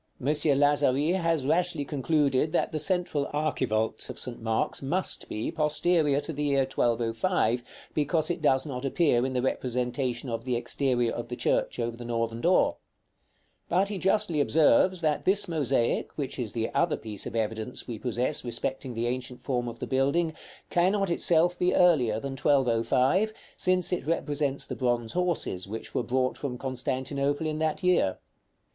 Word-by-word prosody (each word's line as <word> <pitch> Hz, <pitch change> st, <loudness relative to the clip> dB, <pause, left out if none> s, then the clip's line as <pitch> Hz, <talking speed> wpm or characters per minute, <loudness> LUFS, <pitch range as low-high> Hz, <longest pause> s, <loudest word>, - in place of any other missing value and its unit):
M. -, -, -8 dB
Lazari 145 Hz, 0 st, +3 dB
has 165 Hz, -6 st, 0 dB
rashly 165 Hz, 0 st, +1 dB
concluded 145 Hz, 0 st, +1 dB
that -, -, +1 dB
the 155 Hz, -, -2 dB
central 175 Hz, -5 st, -1 dB
archivolt 125 Hz, -7 st, -1 dB
of -, -, -7 dB
St. 125 Hz, -3 st, -3 dB
Mark's 115 Hz, 0 st, -1 dB
must 175 Hz, +8 st, -2 dB
be 110 Hz, -, -3 dB
posterior 155 Hz, -1 st, +2 dB
to 160 Hz, +3 st, -3 dB
the 145 Hz, -, -4 dB
year 140 Hz, -2 st, +2 dB
1205, 120 Hz, +2 st, +1 dB, 0.3 s
because 155 Hz, +3 st, +1 dB
it 170 Hz, -, -4 dB
does 135 Hz, -2 st, +3 dB
not 130 Hz, -3 st, -5 dB
appear 135 Hz, -3 st, +2 dB
in 130 Hz, 0 st, -1 dB
the 125 Hz, -1 st, 0 dB
representation 125 Hz, 0 st, -1 dB
of 115 Hz, -1 st, -3 dB
the 125 Hz, -1 st, -1 dB
exterior 120 Hz, -1 st, 0 dB
of 120 Hz, -, -5 dB
the 125 Hz, -, -5 dB
church -, -, 0 dB
over 120 Hz, -1 st, -2 dB
the 120 Hz, -, -9 dB
northern 115 Hz, -1 st, -2 dB
door; 180 Hz, +2 st, +3 dB, 0.9 s
but 190 Hz, +3 st, +2 dB
he 200 Hz, -2 st, -4 dB
justly 180 Hz, -5 st, +2 dB
observes 160 Hz, +5 st, +4 dB
that 155 Hz, -2 st, 0 dB
this 200 Hz, +1 st, +3 dB
mosaic 140 Hz, -7 st, 0 dB
(which 140 Hz, -3 st, -4 dB
is 115 Hz, -4 st, -3 dB
the 115 Hz, -1 st, -2 dB
other 170 Hz, -2 st, +1 dB
piece 105 Hz, -2 st, -6 dB
of -, -, -7 dB
evidence 110 Hz, +2 st, -3 dB
we 115 Hz, -4 st, -5 dB
possess 125 Hz, +5 st, -1 dB
respecting 125 Hz, +1 st, -3 dB
the 115 Hz, +1 st, -1 dB
ancient 125 Hz, 0 st, -3 dB
form 125 Hz, -3 st, -2 dB
of 115 Hz, 0 st, -6 dB
the -, -, -4 dB
building) 140 Hz, +5 st, +1 dB, 0.4 s
cannot 190 Hz, +2 st, +2 dB
itself 170 Hz, +1 st, +2 dB
be 180 Hz, -, +2 dB
earlier 130 Hz, -12 st, +4 dB
than 135 Hz, +3 st, -5 dB
1205, 135 Hz, -, +2 dB, 0.2 s
since 185 Hz, 0 st, +2 dB
it 160 Hz, -5 st, -3 dB
represents 145 Hz, -4 st, -1 dB
the -, -, -5 dB
bronze 120 Hz, -3 st, 0 dB
horses 170 Hz, -, -1 dB
which 110 Hz, +3 st, -7 dB
were -, -, +1 dB
brought 130 Hz, +1 st, -1 dB
from 130 Hz, -4 st, -4 dB
Constantinople 135 Hz, +3 st, -2 dB
in 155 Hz, 0 st, -2 dB
that 160 Hz, +3 st, -1 dB
year. 180 Hz, -, +2 dB
140 Hz, 165 wpm, -27 LUFS, 120-160 Hz, 0.9 s, observes